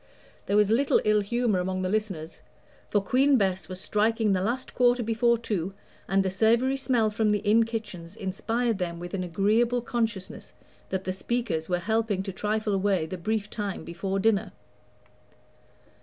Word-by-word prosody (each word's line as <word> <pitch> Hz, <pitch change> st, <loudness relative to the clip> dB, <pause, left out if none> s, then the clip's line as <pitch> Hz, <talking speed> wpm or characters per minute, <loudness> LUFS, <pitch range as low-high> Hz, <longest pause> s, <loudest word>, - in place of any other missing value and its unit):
There 200 Hz, -, +2 dB
was 210 Hz, 0 st, +4 dB
little 265 Hz, +5 st, +3 dB
ill 215 Hz, 0 st, +4 dB
humor 230 Hz, -1 st, 0 dB
among 185 Hz, +1 st, -2 dB
the -, -, 0 dB
listeners, 190 Hz, -7 st, -3 dB, 0.5 s
for 205 Hz, -, +2 dB
Queen 270 Hz, +6 st, +4 dB
Bess 190 Hz, -4 st, 0 dB
was 185 Hz, 0 st, -6 dB
striking 215 Hz, +1 st, +1 dB
the 185 Hz, -, +1 dB
last 240 Hz, +6 st, -2 dB
quarter 245 Hz, 0 st, +3 dB
before 230 Hz, +1 st, +2 dB
two, 195 Hz, -5 st, -3 dB, 0.3 s
and 195 Hz, 0 st, +2 dB
a -, -, +1 dB
savory 230 Hz, +7 st, +3 dB
smell 240 Hz, -5 st, +1 dB
from 215 Hz, 0 st, +1 dB
the 210 Hz, -, +3 dB
inn 225 Hz, +2 st, +4 dB
kitchens 210 Hz, -6 st, -6 dB
inspired 225 Hz, +3 st, -1 dB
them 170 Hz, -2 st, -3 dB
with 175 Hz, 0 st, -7 dB
an 190 Hz, -2 st, -1 dB
agreeable 220 Hz, +7 st, +1 dB
consciousness 225 Hz, -6 st, -3 dB, 0.4 s
that 190 Hz, 0 st, -2 dB
the 185 Hz, -, -2 dB
speakers 190 Hz, -6 st, -2 dB
were 180 Hz, -, +2 dB
helping 215 Hz, +1 st, 0 dB
to 195 Hz, -1 st, -5 dB
trifle 210 Hz, +2 st, -1 dB
away 195 Hz, -3 st, +1 dB
the 175 Hz, -, -5 dB
brief 210 Hz, +4 st, -2 dB
time 205 Hz, -2 st, -4 dB
before 190 Hz, +3 st, -3 dB
dinner. 205 Hz, -1 st, +1 dB
210 Hz, 170 wpm, -27 LUFS, 190-230 Hz, 0.5 s, was